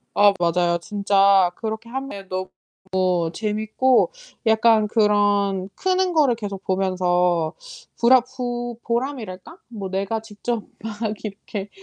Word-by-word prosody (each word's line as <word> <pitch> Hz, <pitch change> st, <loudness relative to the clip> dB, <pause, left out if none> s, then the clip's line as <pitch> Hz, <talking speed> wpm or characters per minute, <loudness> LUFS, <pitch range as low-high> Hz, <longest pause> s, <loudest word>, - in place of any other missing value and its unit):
아 205 Hz, -1 st, +6 dB
맞아요. 170 Hz, 0 st, +2 dB
진짜 195 Hz, -1 st, +3 dB
그렇게 220 Hz, +1 st, -5 dB
하면 245 Hz, -7 st, -6 dB
너 185 Hz, 0 st, -3 dB, 0.4 s
무 180 Hz, -3 st, +1 dB
재밌고 220 Hz, -, +1 dB, 0.3 s
약간 220 Hz, -1 st, +4 dB
그런 205 Hz, -3 st, +2 dB
크는 370 Hz, -1 st, +1 dB
거를 290 Hz, -7 st, +3 dB
계속 200 Hz, -3 st, -6 dB
보면서 180 Hz, -3 st, +1 dB, 0.5 s
부라 250 Hz, +2 st, +6 dB
푸 240 Hz, -1 st, -5 dB
보람이랄까? 235 Hz, -, -4 dB
뭐 205 Hz, -5 st, -6 dB
내가 195 Hz, +4 st, -2 dB
직접 220 Hz, +1 st, -4 dB, 0.2 s
막 220 Hz, 0 st, -3 dB
이렇게 205 Hz, 0 st, -6 dB
210 Hz, 235 characters per minute, -22 LUFS, 190-235 Hz, 0.5 s, 아